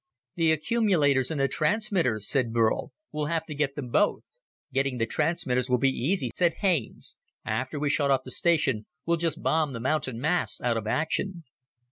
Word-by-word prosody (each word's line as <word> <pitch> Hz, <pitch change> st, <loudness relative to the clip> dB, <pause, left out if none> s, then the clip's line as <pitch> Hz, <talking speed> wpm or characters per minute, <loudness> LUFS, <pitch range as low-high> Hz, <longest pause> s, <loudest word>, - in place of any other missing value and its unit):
"The 165 Hz, -2 st, +2 dB
accumulators 155 Hz, -, +2 dB
and 160 Hz, -3 st, -3 dB
the 135 Hz, -, +3 dB
transmitters," 155 Hz, -, 0 dB
said 125 Hz, -5 st, 0 dB
Burl. 115 Hz, -1 st, +1 dB, 0.2 s
"We'll 150 Hz, -1 st, -2 dB
have 165 Hz, 0 st, -1 dB
to 155 Hz, -, -6 dB
get 145 Hz, -1 st, -1 dB
them 135 Hz, -4 st, -5 dB
both." 205 Hz, +12 st, +2 dB, 0.5 s
"Getting 135 Hz, -1 st, 0 dB
the 115 Hz, -, +1 dB
transmitters 130 Hz, -2 st, 0 dB
will 125 Hz, -, +4 dB
be 135 Hz, +2 st, +3 dB
easy," 130 Hz, -, -1 dB
said 175 Hz, -2 st, +2 dB
Haines. 175 Hz, -, -1 dB, 0.3 s
"After 130 Hz, +3 st, -2 dB
we 150 Hz, -, 0 dB
shut 145 Hz, -1 st, +2 dB
off 135 Hz, -1 st, +2 dB
the 130 Hz, -, -8 dB
station, 135 Hz, -10 st, +1 dB, 0.2 s
we'll 170 Hz, 0 st, +2 dB
just 165 Hz, 0 st, -2 dB
bomb 155 Hz, -3 st, +1 dB
the 115 Hz, -, -5 dB
mountain 130 Hz, -2 st, -1 dB
masts 165 Hz, +6 st, 0 dB
out 120 Hz, -1 st, +1 dB
of 110 Hz, -1 st, -4 dB
action." 165 Hz, -, -1 dB
145 Hz, 180 wpm, -27 LUFS, 125-165 Hz, 0.5 s, will